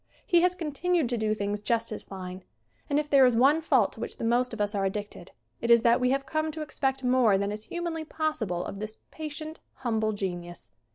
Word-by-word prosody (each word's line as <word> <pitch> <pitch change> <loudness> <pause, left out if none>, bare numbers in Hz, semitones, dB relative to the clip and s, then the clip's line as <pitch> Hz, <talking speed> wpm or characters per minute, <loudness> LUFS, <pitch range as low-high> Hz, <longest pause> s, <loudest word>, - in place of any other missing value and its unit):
He 345 -4 +4
has 360 +1 +3
continued 330 -2 0
to 240 - 0
do 215 0 +1
things 205 0 -2
just 230 +1 0
as 215 - -4
fine. 185 -1 -8 0.5
And 285 - +2
if 300 0 0
there 275 -2 +6
is 250 -2 +5
one 275 +7 +5
fault 265 -10 +3
to - - -13
which - - -5
the - - -6
most 245 +2 +2
of 225 - -7
us 205 0 0
are 200 -1 0
addicted 200 -2 -4 0.3
it 235 - -2
is 235 -1 +7
that 235 +1 +4
we 250 0 +2
have 275 +1 0
come 310 +2 -1
to 315 - -5
ex 300 - -11
pect 270 -1 0
more 250 -5 +4
than 200 +1 -1
is 215 +1 -6
humanly 340 -2 -3
possible 255 - -2
of 195 - -6
this 215 +1 -6
patient, 310 0 -6 0.2
humble 220 -4 0
genius. 175 -3 -5
240 Hz, 230 wpm, -28 LUFS, 210-300 Hz, 0.5 s, is